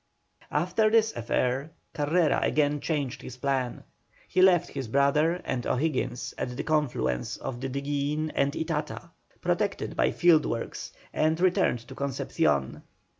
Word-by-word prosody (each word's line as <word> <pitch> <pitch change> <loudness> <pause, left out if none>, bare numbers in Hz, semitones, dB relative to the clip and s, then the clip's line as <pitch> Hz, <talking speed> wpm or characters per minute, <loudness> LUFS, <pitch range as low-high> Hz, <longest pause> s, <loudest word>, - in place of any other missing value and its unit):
After 180 +8 +2
this 225 0 +3
affair 125 +5 0 0.2
Carrera 150 0 +2
again 145 -1 +2
changed 140 -4 -2
his 125 - -9
plan. 130 -2 -1 0.4
He 185 - +2
left 185 -3 +5
his 135 -4 -4
brother 140 +6 +3
and 125 -2 -2
O'Higgins 130 -3 -1
at 125 0 -3
the - - -2
confluence 125 - 0
of 120 -2 -6
the 135 - -2
Diguillin 145 +3 -2
and 140 0 +2
Itata, 155 -3 -3 0.3
protected - - -1
by - - +3
fieldworks, 155 -9 +1 0.2
and 160 +1 +1
returned 175 -10 +2
to - - -9
Concepcion. 75 - -1
145 Hz, 130 wpm, -27 LUFS, 130-160 Hz, 0.4 s, left